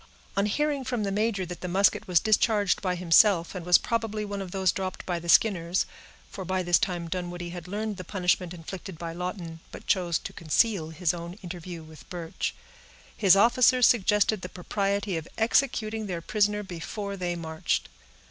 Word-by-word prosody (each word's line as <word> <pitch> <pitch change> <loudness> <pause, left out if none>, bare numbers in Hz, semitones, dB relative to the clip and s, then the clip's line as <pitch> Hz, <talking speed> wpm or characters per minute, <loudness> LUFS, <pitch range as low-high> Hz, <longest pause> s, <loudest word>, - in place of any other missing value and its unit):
On 200 +1 +2
hearing 290 +5 0
from 245 -4 -2
the 200 - -1
major 205 -2 0
that 175 0 -8
the 180 - -4
musket 190 +3 +2
was 180 -3 +4
discharged 215 -1 +2
by 185 -2 0
himself, 175 0 +4
and 185 -3 -6
was 180 0 +6
probably 225 -2 -2
one 200 -1 -4
of 190 - -6
those 190 0 +1
dropped 190 -1 -5
by 175 -2 -2
the 170 0 -7
Skinners 175 -3 +3 0.5
(for 190 - -6
by 185 +1 -1
this 175 0 +4
time 175 -3 -2
Dunwoodie 175 0 -4
had 175 -1 -8
learned 210 +1 -3
the 185 - -6
punishment 180 -1 0
inflicted 180 +1 -8
by 165 0 -5
Lawton, 175 -2 -5
but - - -10
chose 175 -4 +1
to - - -8
conceal 170 +1 +1
his 160 +1 0
own 170 0 -6
interview 175 -1 -7
with 155 0 -15
Birch), 170 -2 -4 0.6
his 195 -2 +5
officers 240 +3 +5
suggested 210 -2 +3
the 180 - -6
propriety 200 +1 -1
of 160 - -6
executing 220 -2 +1
their 180 -3 -3
prisoner 210 +3 +1
before 200 +3 -5
they 180 -2 -2
marched. 160 - -2
185 Hz, 180 wpm, -27 LUFS, 175-210 Hz, 0.6 s, was